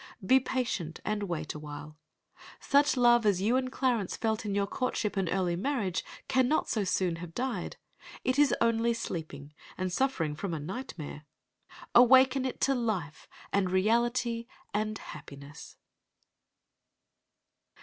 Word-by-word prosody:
Be 260 +7 +6
patient 235 -11 -3
and 215 0 -1
wait 155 -3 -3
awhile. 150 0 -9 0.6
Such 285 -1 +3
love 240 -1 +5
as 205 -4 +3
you 215 +6 +2
and 255 0 0
Clarence 245 -8 0
felt 220 -1 -1
in 200 - -1
your 200 0 +2
courtship 210 -1 -2
and 190 -3 0
early 180 -3 0
marriage 200 - -1 0.2
cannot 260 +3 +2
so 215 - 0
soon 180 -2 0
have 165 -1 -9
died. 255 0 -3 0.5
It 255 +2 +1
is 290 -1 +5
only 230 0 +2
sleeping, 155 -9 -6 0.2
and 185 -1 -2
suffering 180 - 0
from 175 +1 -3
a - - -4
nightmare. 155 - -7 0.7
Awaken 260 +2 +6
it 260 - -3
to 275 - +3
life 215 - -3 0.3
and 195 -2 +2
reality 235 +4 +1 0.3
and 215 +1 -1
happiness. 140 -5 -11
215 Hz, 135 wpm, -30 LUFS, 175-250 Hz, 0.7 s, Be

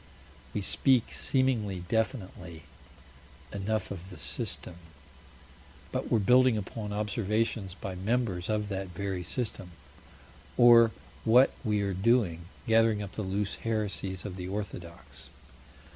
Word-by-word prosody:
We 105 - 0
speak 130 +4 +2
seemingly 115 -8 0
definitely 95 - -3 0.9
enough 100 +1 -2
of 95 -1 -7
"the 90 - -10
System," 85 - -4 1.1
but - - -3
we're - - +5
building 125 +3 +5
upon 105 +1 -5
observations 105 -1 -1
by 95 0 -6
members 95 -1 -1
of 105 -1 0
that 95 -1 -3
very 95 +1 -3
system. 95 -3 -4 0.8
Or 120 -1 +8 0.3
what 125 +4 +6
we 105 -3 +1
are 100 -1 -1
doing 95 -4 +2 0.2
gathering 115 -2 +3
up 100 - -7
the - - -5
loose 100 +1 -2
heresies 100 -4 -2
of 95 -3 -5
the 90 -1 -5
orthodox. 90 -4 -7
105 Hz, 120 wpm, -29 LUFS, 95-115 Hz, 1.1 s, Or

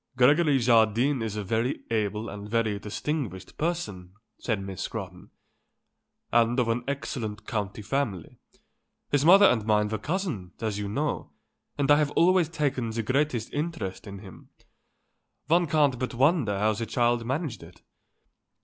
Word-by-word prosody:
"Gregory 145 +3 +5
Jardine 120 +2 +3
is 110 -2 -3
a 105 - -3
very 115 +6 -1
able 105 0 -1
and 100 0 -7
a - - -13
very 110 -2 0
distinguished 105 - -4
person," 150 - -3 0.3
said 110 -4 -1
Miss 95 -2 -6
Scrotton, - - -6 1.0
"and 120 +2 +3
of 120 -2 +1
an 120 +2 0
excellent 110 -6 -4
county 105 -1 -4
family. 100 - -3 0.7
His 145 -1 +2
mother 195 +5 +8
and 115 - +3
mine 105 -1 +2
were 110 -1 -3
cousins, 150 - -3
as 110 -2 -2
you 100 -1 -3
know, 145 +8 -2 0.5
and 145 0 +2
I 145 - +7
have 150 -1 +2
always 180 -2 +4
taken 140 -7 -1
the 115 +1 -3
greatest 130 -1 0
interest 145 - -4
in 100 0 -7
him. 95 -2 -13 1.0
One 170 +3 +3
can't 145 -4 +2
but 125 -1 -3
wonder 130 - +2
how 105 +2 +2
the 115 +2 -4
child 120 0 +1
managed 130 +1 -3
it." 85 0 -15
115 Hz, 155 wpm, -27 LUFS, 105-145 Hz, 1.0 s, mother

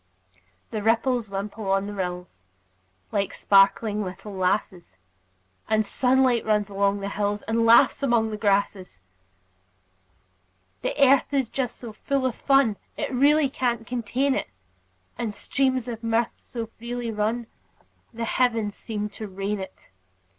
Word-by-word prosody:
The 215 - -3
ripples 230 +1 +1
wimple 200 +1 -5
on 195 0 +2
the 205 - -6
rills, 180 - -5 0.7
Like 200 -2 -1
sparkling 205 +2 +3
little 195 +2 -7
lasses; 185 - -2 0.7
The 220 0 +3
sunlight 250 +2 +2
runs 210 -1 +1
along 200 0 +1
the 200 - -3
hills, 205 0 -2
And 230 +1 +1
laughs 230 +5 +6
among 235 -5 +2
the 215 - -4
grasses. 200 - 0 1.8
The - - -2
earth 275 0 +5
is 270 -5 0
just 260 -3 -3
so 235 -3 -9
full 275 +4 -1
of 255 - +1
fun 270 -5 +2 0.2
It - - -3
really 290 +3 +4
can't 240 -4 -2
contain 250 +4 0
it; - - -2 0.7
And 215 -3 -3
streams 260 -1 0
of 230 -1 -6
mirth 230 +1 +1
so 230 -2 -6
freely 240 0 -4
run 220 +3 -1 0.7
The 230 0 -4
heavens 225 -4 +1
seem 210 -1 -4
to 215 +1 -8
rain 200 +2 -3
it. 190 - -10
220 Hz, 140 wpm, -25 LUFS, 200-245 Hz, 1.8 s, laughs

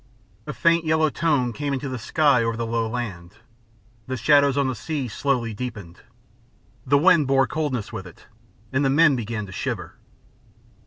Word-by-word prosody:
A - - -3
faint 170 -1 +2
yellow 155 -1 +2
tone 140 -8 0
came 145 +3 -3
into 135 +1 -3
the 130 -2 -5
sky 145 +1 +2
over 115 0 -2
the 115 - -2
low 115 -1 -1
land. 100 -6 -6 0.7
The 130 0 -3
shadows 140 +2 +4
on 140 -1 +2
the 130 - -1
sea 140 +3 -4
slowly 120 -1 -1
deepened. 105 -7 -7 0.9
The 140 +2 +4
wind 155 -2 +4
bore 135 0 +3
coldness 130 -6 -3
with 95 - -6
it, 90 - -16 0.5
and 135 +2 +1
the 135 - +2
men 145 0 +4
began 115 -3 -4
to 95 - -11
shiver. - - -5
130 Hz, 170 wpm, -23 LUFS, 115-145 Hz, 0.9 s, shadows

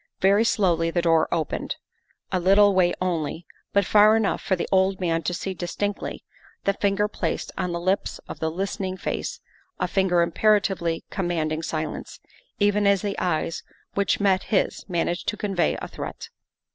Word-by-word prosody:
Very 200 +3 +4
slowly 175 -7 +2
the 170 +1 0
door 165 -2 +3
opened, 160 -3 -2 0.6
a 185 - +1
little 200 +3 +5
way 180 -2 +4
only, 170 -2 -2 0.3
but 200 -1 +3
far 210 +2 +6
enough 220 -3 +1
for 190 - +1
the 175 - -3
old 190 0 +3
man 165 -3 0
to 165 - -2
see 190 +2 -3
distinctly 195 +4 -4 0.4
the 200 - +2
finger 200 +1 +1
placed 170 -5 -3
on 180 - -2
the 170 - -2
lips 185 +3 0
of - - -8
the 160 - 0
listening 190 +2 -3
face - - -3 0.4
a 180 - +1
finger 180 -2 +2
imperatively 180 -2 +1
commanding 165 -4 -1
silence, 155 -1 -4 0.4
even 205 0 +3
as 200 -2 +3
the 200 -1 -2
eyes 165 -2 -1 0.3
which 200 -1 +1
met 195 -2 +2
his 195 - 0
managed 175 0 -1
to 210 - -1
convey 195 -4 0
a - - -5
threat. - - -7
185 Hz, 165 wpm, -24 LUFS, 170-200 Hz, 0.6 s, far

